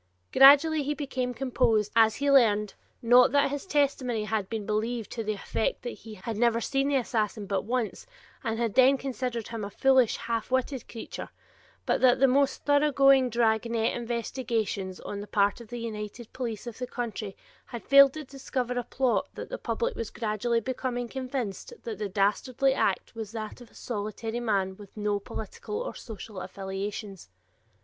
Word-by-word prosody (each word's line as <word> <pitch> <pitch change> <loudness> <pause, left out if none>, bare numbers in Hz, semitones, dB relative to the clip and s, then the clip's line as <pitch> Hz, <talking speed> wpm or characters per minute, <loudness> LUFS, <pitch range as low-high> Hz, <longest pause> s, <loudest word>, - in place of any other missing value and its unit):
Gradually 290 +3 +7
he 290 +1 -2
became 260 -3 -2
composed 225 -4 +1
as 225 -1 +5
he 285 +1 +1
learned, 210 -6 +4 0.3
not 245 +1 +6
that 285 -1 +3
his 285 +6 -4
testimony 270 - +1
had 210 -2 -2
been 220 -2 -4
believed 220 +2 -2
to 225 - -3
the 215 0 -1
effect 210 +2 -2
that 240 - -3
he 220 -1 -11
had 210 +3 -5
never 230 0 +3
seen 275 +3 0
the 285 - +1
assassin 220 -4 -1
but 195 -1 -2
once 240 - -2 0.4
and 225 -2 -1
had 230 -3 -1
then 265 +1 +6
considered 255 -4 -4
him 230 -2 -5
a 200 - -4
foolish 260 +2 +3
half 230 -2 -3
witted 260 0 -1
creature, 230 - -7 0.6
but - - +1
that 255 -1 +5
the 270 - +6
most 270 +1 +2
thoroughgoing 275 -3 +5
"dragnet" 230 0 +1
investigations 230 -5 -3
on 200 - -5
the 205 - -8
part 205 +2 +1
of 235 - -11
the 240 - -6
united 220 0 -6
police 235 -4 -4
of 240 -1 -8
the 250 - -3
country 220 -5 -5 0.3
had 235 - -8
failed 275 -1 +7
to 310 - -6
discover 260 -2 -3
a - - -3
plot 255 0 0
and - - -37
that - - -7
the - - -5
public 480 0 -2
was 230 - -4
gradually 230 +1 -1
becoming 245 0 -3
convinced 255 - -4
that 230 -4 -5
the 210 -2 -2
dastardly 225 +7 +1
act 200 -7 0
was 220 -3 -6
that 220 +1 -6
of 240 - -13
a - - -24
solitary 220 +1 -4
man 195 -5 0
with 205 0 -14
no 205 -1 0
political 220 - -6
or - - -4
social 215 -3 -9
affiliations. 195 - -6
235 Hz, 180 wpm, -28 LUFS, 215-260 Hz, 0.6 s, Gradually